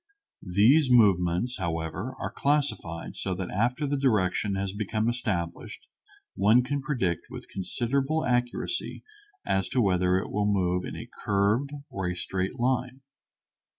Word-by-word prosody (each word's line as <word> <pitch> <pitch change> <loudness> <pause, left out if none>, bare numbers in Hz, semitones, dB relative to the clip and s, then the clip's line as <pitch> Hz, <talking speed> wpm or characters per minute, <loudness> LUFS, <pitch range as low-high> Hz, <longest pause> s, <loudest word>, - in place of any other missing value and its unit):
These 130 +8 +5
movements, 105 -1 +3
however, 85 +7 -3
are - - -3
classified 140 - -1
so 95 -2 -2
that 95 0 -5
after 125 - 0
the 145 0 -1
direction 105 -5 +1
has 95 0 -2
become 110 +1 -1
established 110 -9 -3 0.5
one 110 +6 +4
can 140 +2 -2
predict 120 - -1
with - - -9
considerable 135 - -1
accuracy 125 - -1 0.4
as 95 -1 0
to 130 - 0
whether 90 -4 +3
it 95 - -3
will 105 0 +1
move 90 -2 +1
in - - -6
a - - -7 0.2
curved 105 +7 +2 0.2
or 95 -2 -2
a 90 - -3
straight 95 +2 -3
line. 125 +1 0
105 Hz, 140 wpm, -27 LUFS, 95-125 Hz, 0.5 s, These